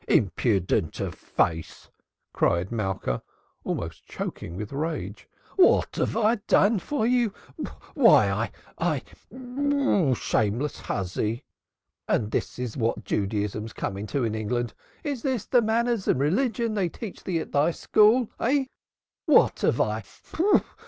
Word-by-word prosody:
"Impudent 95 -5 +1
of - - -2
face!" 80 -1 -2 0.4
cried 85 +4 +1
Malka, 95 - -2 0.4
almost 80 -1 -4
choking 85 - -5
with 105 +5 -6
rage. 155 +3 -4 0.3
"What 370 - +4
have - - 0
I 225 +1 +3
done 205 +1 +4
for 285 +2 -1
you? 240 -2 +2 0.6
Why - - +5
why - - -26 0.3
I - - +1 0.6
I 280 - +2
shameless 115 +7 0
hussy! 105 +6 -2 0.6
And 105 0 +1
this - - -2
is 125 -3 -4
what 115 -2 -1
Judaism's 105 +2 -2
coming 100 +2 -4
to 135 +5 -1
in 110 -2 0
England! 115 +2 -2 0.3
This 285 -6 -3
is 260 -6 -1
the 245 - +4
manners 230 -1 0
and - - +3
religion 225 - +1
they 195 -5 0
teach 210 +3 -8
thee 180 -3 -1
at 160 - -4
thy 145 +3 +3
school, 215 +7 +4
eh? 270 +3 +2 0.6
What - - +5
have - - +1
I - - 0
145 Hz, 130 wpm, -26 LUFS, -, 0.6 s, Why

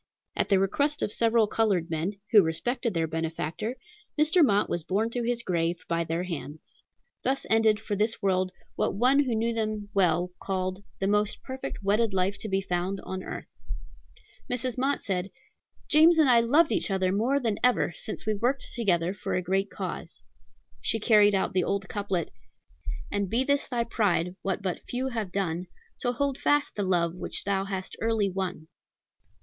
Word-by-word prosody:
At - - 0
the 195 - +5
request 285 +10 +1
of - - 0
several 230 0 +3
colored 200 -6 0
men, 165 +5 -1 0.2
who 210 - +8
respected 215 +7 -1
their 165 -1 +1
benefactor, 165 +7 -3 0.4
Mr. 315 +3 +5
Mott 205 -6 +3
was 175 - -1
borne 205 +8 -1
to 245 - -2
his 235 0 -1
grave 170 -2 -1
by 170 0 0
their 165 +2 -2
hands. 160 -4 -7 0.4
Thus 270 +1 -1
ended, 220 -1 +4
for 215 -2 -3
this 215 +3 0
world, 185 -2 +1 0.2
what - - 0
one 255 +6 +4
who 245 -3 0
knew 230 +1 0
them 215 -2 -2
well 180 -2 +2
called 185 0 -2
"the 195 - -2
most 210 +1 +1
perfect 260 -5 -6
wedded 205 +1 +2
life 190 +2 +1
to 215 - -4
be 195 0 +1
found 185 +1 -2
on 190 0 -5
earth." - - -6 1.0
Mrs. 250 0 -2
Mott 270 +2 0
said, 190 -1 -2 0.6
"James 320 +3 +6
and 310 -3 +5
I 240 -2 +6
loved 290 +8 +4
each - - +1
other 190 -1 +1
more 235 +8 +2
than 225 -6 -1
ever 250 -7 +3
since 215 - -5
we 215 - +1
worked 245 +7 -1
together 180 -6 +1
for 200 - -3
a 180 - +1
great 195 +3 0
cause." - - -6 0.6
She 225 - 0
carried 210 -2 +5
out 190 - 0
the 185 -1 +2
old 200 +1 -1
couplet: 195 -5 -2 0.8
"And 200 -2 -1
be 235 +5 +2
this 280 +1 +1
thy 240 -2 0
pride, 185 -6 0
what 195 +1 -2
but 185 -2 -2
few 255 +2 -1
have 220 -6 -3
done, 180 -2 -2 0.3
To 245 - 0
hold 275 +2 -1
fast 290 0 +2
the 205 - -2
love 175 -3 +1 0.3
thou 195 -1 0
hast 190 -1 -4
early 225 -3 +1
won." 180 -4 -4
205 Hz, 180 wpm, -27 LUFS, 185-235 Hz, 1.0 s, who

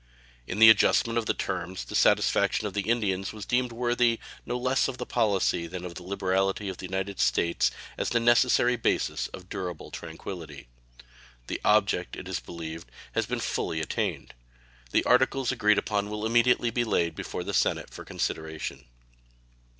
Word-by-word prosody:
In 90 - -4
the 110 0 +10
adjustment 115 +1 +3
of 110 - -4
the - - +2
terms 90 +2 -4
the - - -9
satisfaction - - +3
of - - -3
the 100 +1 -2
Indians 100 -5 0
was 105 -2 -7
deemed 125 0 0
worthy 120 0 +1 0.3
no 125 - -1
less 130 +2 +1
of 130 -2 -5
the 125 - -4
policy 100 -8 +1
than 90 +1 -6
of 90 - -6
the 90 - -9
liberality 95 +2 -1
of 95 - -6
the 95 - -6
United 95 +1 -3
States 85 -8 +2 0.3
as - - 0
the 120 - +2
necessary 120 +1 +4
basis 115 - 0
of 90 -1 -11
durable 90 -3 -6
tranquillity. 80 -3 -8 0.8
The - - -4
object, 100 -4 +2
it 95 - -8
is 95 -3 -2
believed, 80 -5 -8 0.2
has - - -1
been - - -2
fully 80 - -2
attained. 80 - -3 0.6
The - - +2
articles 135 -3 +3
agreed 105 0 +3
upon 105 -1 -1
will 105 +1 -4
immediately 120 +1 +3
be 120 - +1
laid 85 -7 +1
before - - -5
the - - -4
Senate - - +1
for - - -11
their - - -9
consideration. 80 0 -4
100 Hz, 175 wpm, -27 LUFS, 90-120 Hz, 0.8 s, the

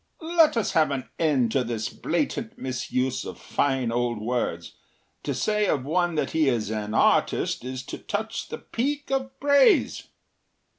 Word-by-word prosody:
“Let 320 -7 +5
us 225 - +1
have 155 -2 +3
an 135 -2 -4
end 135 -8 +2
to 130 0 +2
this 115 -2 -3
blatant 230 -6 -2
misuse 130 0 -2
of - - -7
fine 135 -4 0
old 120 -1 0
words. 110 -7 -2 0.5
To - - -3
say 210 -1 +1
of 135 -7 0
one 175 +2 +1
that 155 - -1
he 155 -3 +3
is 110 -4 -1
an 105 0 -3
artist - - +2
is 130 0 -5
to - - -7
touch 220 +2 -4
the - - -5
peak 285 +4 -3
of 265 0 -2
praise. 285 +6 +4
140 Hz, 160 wpm, -25 LUFS, -, 0.5 s, Let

